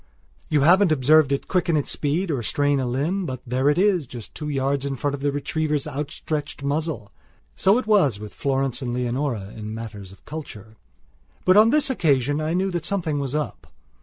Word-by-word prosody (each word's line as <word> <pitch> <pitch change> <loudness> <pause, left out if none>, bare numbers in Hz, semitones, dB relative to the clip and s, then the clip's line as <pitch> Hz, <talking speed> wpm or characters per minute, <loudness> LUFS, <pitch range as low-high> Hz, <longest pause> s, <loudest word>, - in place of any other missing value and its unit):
You 150 - +2
haven't 180 +4 +5
observed 150 0 +4
it 140 - -1
quicken 170 -3 +1
its 145 - -1
speed 160 +5 -1
or 135 -5 -1
strain 145 +4 +1
a 130 - -1
limb; 160 +10 -1
but 130 -2 -4
there 130 +3 +1
it 150 - +2
is, 185 -6 +2
just 120 -2 -10
two 150 -1 -5
yards 135 -1 0
in 140 -1 -2
front 140 +2 -2
of 140 - -5
the 145 0 +1
retriever's 150 +1 -1
outstretched 145 0 -4
muzzle. 140 -6 -2 0.4
So 200 +4 +4
it 255 - -2
was 185 - +3
with 105 0 -9
Florence 135 -2 -1
and 120 -2 -3
Leonora 125 -4 -2
in 110 0 -6
matters 105 -4 -8
of 95 - -18
culture. 110 -9 -8 0.7
But 185 - +5
on 215 +2 +7
this 290 +1 +2
occasion 145 - +1
I 155 +2 -1
knew 190 +1 0
that 175 -2 -2
something 165 -7 -1
was 140 0 -3
up. 150 -1 -4
145 Hz, 195 wpm, -23 LUFS, 130-160 Hz, 0.7 s, on